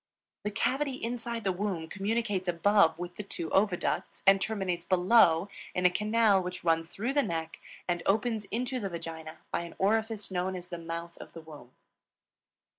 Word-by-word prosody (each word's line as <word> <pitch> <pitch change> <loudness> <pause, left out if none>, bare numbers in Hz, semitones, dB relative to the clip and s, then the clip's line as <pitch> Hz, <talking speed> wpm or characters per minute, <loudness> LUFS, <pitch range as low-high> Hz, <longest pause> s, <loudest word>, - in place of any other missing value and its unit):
The 210 - -1
cavity 270 +6 0
inside 235 -1 -4
the 190 - +2
womb 180 -3 -2
communicates 205 0 -1
above 175 0 +4
with 175 0 -6
the - - -3
two 170 -4 -5
oviducts 190 -3 0
and 195 0 +6
terminates 190 -5 -1
below 180 -1 +5 0.3
in 180 - 0
a 180 - +7
canal 210 0 +3
which 180 0 -5
runs 165 -1 +2
through 225 +9 -3
the 290 - +4
neck 165 -8 -3 0.3
and 175 -1 0
opens 215 +1 +1
into 250 +4 -2
the 200 -4 -3
vagina 165 -2 -7
by - - 0
an 170 -1 -8
orifice 220 +1 0
known 185 +1 -1
as 180 0 -8
the 175 -2 -5
mouth 170 +1 -6
of - - -11
the 165 - -8
womb. 145 -6 -13
190 Hz, 175 wpm, -30 LUFS, 170-215 Hz, 0.3 s, a